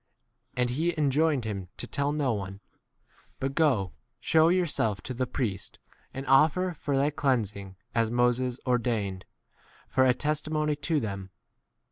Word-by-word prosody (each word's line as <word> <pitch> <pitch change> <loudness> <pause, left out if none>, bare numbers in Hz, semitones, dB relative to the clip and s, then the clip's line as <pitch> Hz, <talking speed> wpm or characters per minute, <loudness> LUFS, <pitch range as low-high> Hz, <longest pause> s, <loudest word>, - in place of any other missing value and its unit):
And 125 0 +1
lie 170 +1 +1
enjoined 145 -2 +2
him 100 -4 -4
to - - -5
tell 140 0 -1
no 145 -5 +1
one; 100 -2 -5 0.8
but 135 +1 -2
go, 130 - +2 0.3
shew 160 +6 +4
thyself 155 - +1
to 130 - -5
the 125 +1 -1
priest, 105 -9 -3 0.3
and 135 +1 -6
offer 160 +7 +4
for 145 -3 -2
thy 140 +2 +2
cleans 130 -8 0
ing 95 -1 -9 0.2
as 115 -1 +2
Moses 120 +1 +1
ordained, 115 -7 0 0.6
for 130 - +3
a 125 -1 +4
testi 150 +2 -1
15 155 - -5
mony 150 -1 +1
to 150 +2 0
them. 100 -5 -5
130 Hz, 155 wpm, -28 LUFS, 110-150 Hz, 0.8 s, shew